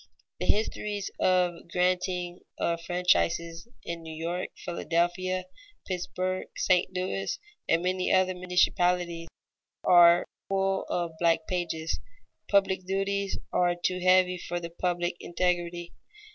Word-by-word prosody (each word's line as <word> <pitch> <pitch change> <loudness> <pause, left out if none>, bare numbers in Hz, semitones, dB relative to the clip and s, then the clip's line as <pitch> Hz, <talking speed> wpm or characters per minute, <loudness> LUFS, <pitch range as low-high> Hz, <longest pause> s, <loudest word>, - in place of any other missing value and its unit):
The - - -2
histories 210 -1 0
of 180 -1 +3
the 170 - -14
granting 180 0 0 0.2
of 170 0 -1
franchises 170 -1 +1 0.2
in 170 0 -5
New 160 -1 -8
York, 170 +3 -3
Philadelphia, 175 +2 -1 0.4
Pittsburg, 185 0 -3
St. 180 -1 +2
Louis, 190 - -2 0.3
and 165 +1 +3
many 185 0 0
other 185 0 +3
municipalities, 180 -1 +1 0.6
are 175 -1 +7 0.2
full 195 0 +1
of 175 -1 -1
black 165 -1 +2
pages. 165 -3 -2 0.5
Public 195 -2 +3
duties 195 +1 -1 0.2
are 175 -1 +3
too 180 +1 -1
heavy 185 0 +4
for 175 0 -3
the 170 -1 -7
public 175 0 -1
integrity. 175 -1 -1
180 Hz, 115 wpm, -28 LUFS, 170-185 Hz, 0.6 s, are